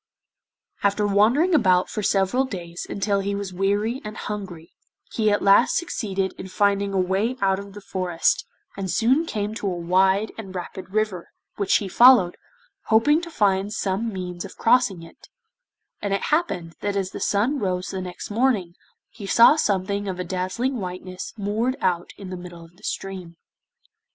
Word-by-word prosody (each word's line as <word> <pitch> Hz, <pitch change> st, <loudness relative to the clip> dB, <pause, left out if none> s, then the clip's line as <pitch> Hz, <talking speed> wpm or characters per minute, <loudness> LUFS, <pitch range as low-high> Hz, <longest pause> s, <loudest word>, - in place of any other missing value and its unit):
After 205 Hz, +1 st, +1 dB
wandering 225 Hz, -, +3 dB
about 185 Hz, -, +4 dB
for 215 Hz, -, -4 dB
several 200 Hz, +5 st, +2 dB
days 175 Hz, -7 st, -7 dB
until 200 Hz, 0 st, 0 dB
he 200 Hz, +1 st, -2 dB
was 200 Hz, -2 st, -5 dB
weary 205 Hz, +6 st, 0 dB
and 215 Hz, 0 st, -7 dB
hungry, 190 Hz, -6 st, -7 dB, 0.4 s
he 215 Hz, -2 st, +2 dB
at 205 Hz, -, +1 dB
last 200 Hz, 0 st, +5 dB
succeeded 195 Hz, -, -2 dB
in 190 Hz, -, -6 dB
finding 200 Hz, +1 st, +1 dB
a 195 Hz, -, 0 dB
way 195 Hz, +7 st, 0 dB
out 195 Hz, -2 st, +2 dB
of 200 Hz, 0 st, -10 dB
the 205 Hz, -, -10 dB
forest, 185 Hz, -3 st, 0 dB, 0.3 s
and 195 Hz, -2 st, -4 dB
soon 255 Hz, -, +2 dB
came 210 Hz, -4 st, -3 dB
to 215 Hz, -2 st, -4 dB
a 180 Hz, -2 st, -2 dB
wide 190 Hz, +4 st, +2 dB
and 190 Hz, -4 st, -8 dB
rapid 185 Hz, +1 st, -7 dB
river, 205 Hz, -3 st, -2 dB, 0.3 s
which 200 Hz, -2 st, +2 dB
he 200 Hz, -, -4 dB
followed, 235 Hz, -4 st, +6 dB, 0.5 s
hoping 290 Hz, +9 st, +4 dB
to 340 Hz, -, -7 dB
find 200 Hz, -, +1 dB
some 215 Hz, +2 st, -1 dB
means 180 Hz, -2 st, -5 dB
of 195 Hz, -, -10 dB
crossing 225 Hz, -7 st, +2 dB
it, 165 Hz, -, -16 dB, 0.7 s
and 200 Hz, -1 st, 0 dB
it 195 Hz, -, -3 dB
happened 180 Hz, -, 0 dB
that 205 Hz, 0 st, -2 dB
as 195 Hz, -1 st, -1 dB
the -, -, -7 dB
sun 235 Hz, +8 st, +1 dB
rose 185 Hz, -3 st, -2 dB
the 190 Hz, -, -4 dB
next 180 Hz, +2 st, -7 dB
morning 215 Hz, -7 st, +1 dB, 0.4 s
he 205 Hz, -4 st, -9 dB
saw 235 Hz, +8 st, +7 dB
something 200 Hz, -6 st, 0 dB
of 185 Hz, -1 st, -4 dB
a -, -, -1 dB
dazzling 185 Hz, +9 st, -2 dB
whiteness 185 Hz, -1 st, -6 dB
moored 220 Hz, +5 st, -1 dB
out 175 Hz, -5 st, 0 dB
in 190 Hz, -2 st, -8 dB
the 185 Hz, -, -5 dB
middle 175 Hz, -1 st, -10 dB
of 165 Hz, +1 st, -20 dB
the 200 Hz, -, -23 dB
stream. 185 Hz, -3 st, -5 dB
195 Hz, 175 wpm, -23 LUFS, 185-215 Hz, 0.7 s, saw